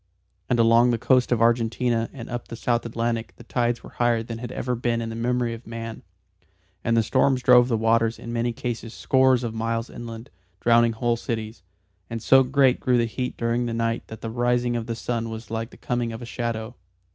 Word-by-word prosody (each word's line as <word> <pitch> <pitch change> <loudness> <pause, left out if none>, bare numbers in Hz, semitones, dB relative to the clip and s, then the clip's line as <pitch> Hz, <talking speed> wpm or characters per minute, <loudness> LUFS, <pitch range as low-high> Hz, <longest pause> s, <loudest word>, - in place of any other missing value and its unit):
And 125 - +2
along 115 +1 +5
the 120 - +2
coast 125 +2 +2
of 115 -2 +3
Argentina 115 0 +1
and 120 -4 -9
up 120 0 -5
the - - -7
South 120 0 0
Atlantic 115 0 -2
the - - -13
tides 120 0 -1
were - - -11
higher 120 -2 +1
than 115 0 -6
had 120 0 -6
ever 125 0 -2
been 120 -1 0
in 115 -1 -3
the 115 - -5
memory 120 0 0
of 115 +2 -10
man, 115 0 -6 0.8
and 115 0 +2
the 115 - +4
storms 130 +2 +2
drove 125 -1 +7
the 115 -3 +1
waters 115 +1 +2
in 115 - -7
many 120 +1 0
cases 115 -1 -5
scores 130 -2 +3
of 115 -2 -3
miles 115 +1 -2
inland, 115 +1 -8 0.3
drowning 115 0 +4
whole 120 +1 0
cities. 110 -1 -5 0.5
And 115 - -4
so 135 +4 +6
great 130 0 +3
grew 125 -2 +2
the 120 - +2
heat 125 +2 -4
during 120 +1 0
the 115 - -3
night 115 0 -1
that 110 0 -10
the 115 - -4
rising 120 0 +1
of 115 -1 -3
the 115 - -2
sun 115 0 -3
was 110 0 -8
like 115 +1 -3
the - - -16
coming 120 -2 -2
of 115 +2 -7
a - - -5
shadow. 115 -1 -4
115 Hz, 215 wpm, -24 LUFS, 115-120 Hz, 0.8 s, drove